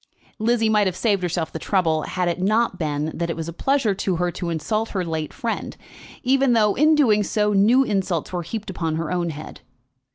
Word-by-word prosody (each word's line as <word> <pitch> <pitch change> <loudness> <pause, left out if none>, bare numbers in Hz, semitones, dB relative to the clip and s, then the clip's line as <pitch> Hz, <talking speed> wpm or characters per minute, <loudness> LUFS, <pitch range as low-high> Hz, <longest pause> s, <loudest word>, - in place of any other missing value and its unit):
Lizzie 225 0 +2
might 210 -2 +3
have 185 - -2
saved 200 -2 +1
herself 170 -2 -2
the 160 - -4
trouble, 165 -5 +1
had 180 +3 -2
it 175 +1 -1
not 215 0 +1
been 150 -1 -2
that 170 0 -2
it 165 - -2
was 165 0 -5
a 170 - -5
pleasure 265 - +1
to 190 -1 -1
her 175 +1 0
to 175 0 -4
insult 215 +8 -1
her 185 -3 -2
late 160 -2 -3
friend, 235 -4 -4 0.5
even 265 0 +3
though 210 -3 +3
in 310 +6 +4
doing 225 -8 +4
so 210 +1 0
new 220 +7 +5
insults 190 - -2
were 175 - -1
heaped 210 +4 -5
upon 165 -3 -2
her 160 0 -3
own 175 -1 -1
head. 155 0 -8
190 Hz, 215 wpm, -22 LUFS, 165-220 Hz, 0.5 s, new